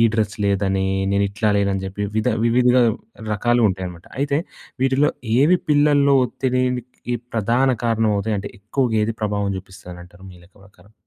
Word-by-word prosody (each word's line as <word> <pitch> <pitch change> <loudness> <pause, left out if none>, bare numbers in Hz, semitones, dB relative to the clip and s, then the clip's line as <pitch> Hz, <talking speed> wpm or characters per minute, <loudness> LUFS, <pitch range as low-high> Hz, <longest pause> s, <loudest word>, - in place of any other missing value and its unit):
Dress 110 -2 0
లేదని, 95 -1 0 0.3
నేను 100 0 +2
ఇట్లా 110 +1 -1
లేనని 100 -1 0
చెప్పి 100 +2 -5
విధ 110 +3 +1 0.2
వివిధ 125 +1 +3 0.6
రకాలుంటాయనమాట. 100 -6 0
అయితే 140 0 +1 0.4
వీటిలో 135 +2 +3 0.3
ఏవి 175 +5 +4
పిల్లలో 145 -1 +4
ఒత్తిడినికి 125 -1 -2 0.2
ప్రధాన 120 +5 +2
కారణమవుతాయి? 110 -2 +1
అంటే 100 +1 -6
ఎక్కువగా 115 +3 -1
ఏది 110 +1 -1
ప్రభావం 100 -1 -1
జూపిస్తానంటారు 90 -1 -13
మీ 90 - -15
లెక్క 90 +4 -23
ప్రకారం? 100 +2 -22
110 Hz, 130 wpm, -21 LUFS, 100-125 Hz, 0.6 s, ఏవి